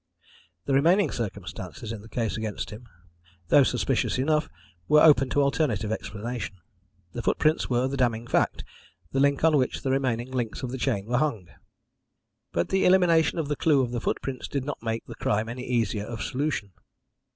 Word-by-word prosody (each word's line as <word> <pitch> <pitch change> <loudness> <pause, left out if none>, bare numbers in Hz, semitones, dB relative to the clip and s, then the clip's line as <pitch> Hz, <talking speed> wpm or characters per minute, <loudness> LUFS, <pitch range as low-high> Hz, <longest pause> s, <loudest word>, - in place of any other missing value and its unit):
The 140 - 0
remaining 170 +9 +4
circumstances 100 - -6
in 110 -3 -6
the 110 - -14
case 115 -7 -2
against 110 0 -4
him, 115 +3 -10 0.6
though 145 - +7
suspicious 130 -1 +1
enough, 150 +3 +1 0.4
were 150 - +6
open 135 -4 +6
to 145 - +2
an - - +4
alternative 125 -7 0
explanation. 110 0 -4 0.6
The 120 - -4
footprints 155 +6 +1
were 125 +1 +2
the 140 +1 -3
damning 120 -3 +1
fact - - 0 0.5
the 135 - 0
link 140 +1 +2
on 160 -2 +5
which 130 -2 -1
the 130 - 0
remaining 130 -2 -1
links 120 -1 -3
of 125 - -3
the 130 - -5
chain 115 -7 0
were 120 +2 0
hung. 115 - -1 1.0
"But 85 - -1
the 190 - +2
elimination 180 -3 +4
of 160 -3 -1
the 145 - -1
clue 145 -3 +3
of 120 - -3
the 120 -2 -3
footprints 130 +1 -3
did 140 -2 -3
not 145 - -5
make 115 0 -3
the - - -8
crime 110 +2 -1
any 125 +2 -6
easier 115 -4 0
of 115 -1 -5
solution. 135 -7 -2
125 Hz, 185 wpm, -26 LUFS, 115-140 Hz, 1.0 s, though